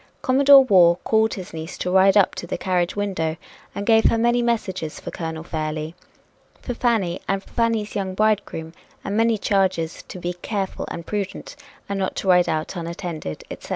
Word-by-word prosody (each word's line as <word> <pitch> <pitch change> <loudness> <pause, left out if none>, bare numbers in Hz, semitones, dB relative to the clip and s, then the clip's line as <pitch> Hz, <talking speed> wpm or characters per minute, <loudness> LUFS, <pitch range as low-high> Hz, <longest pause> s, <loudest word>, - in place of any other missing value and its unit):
Commodore 275 +1 +7
Waugh 180 -8 +5
called 220 0 +2
his 185 -2 -8
niece 160 +1 -7
to 180 - -2
ride 190 +2 +5
up 200 - +4
to 175 - -7
the - - -3
carriage 180 -1 0
window 185 -6 -2 0.4
and 200 - -4
gave 225 0 +4
her - - +4
many 240 +1 +2
messages 190 -9 -2
for - - -7
Colonel 160 -1 -5
Fairlie, 155 -1 -4 0.7
for 245 - -5
Fanny 220 -8 0
and 195 0 -1
for - - -20
Fanny's 230 -3 0
young 190 -2 -3
bridegroom, 205 -6 0 0.3
and 205 - -3
many 225 0 +3
charges 190 -5 0
to - - -8
be 175 0 -3
careful 195 +2 -4
and 170 - -6
prudent, 200 +3 -4 0.3
and 200 0 -3
not 190 - -2
to - - -4
ride 180 -2 +5
out 160 +3 -2
unattended, 170 - -5
etc. - - -9
190 Hz, 185 wpm, -22 LUFS, 170-215 Hz, 0.7 s, Commodore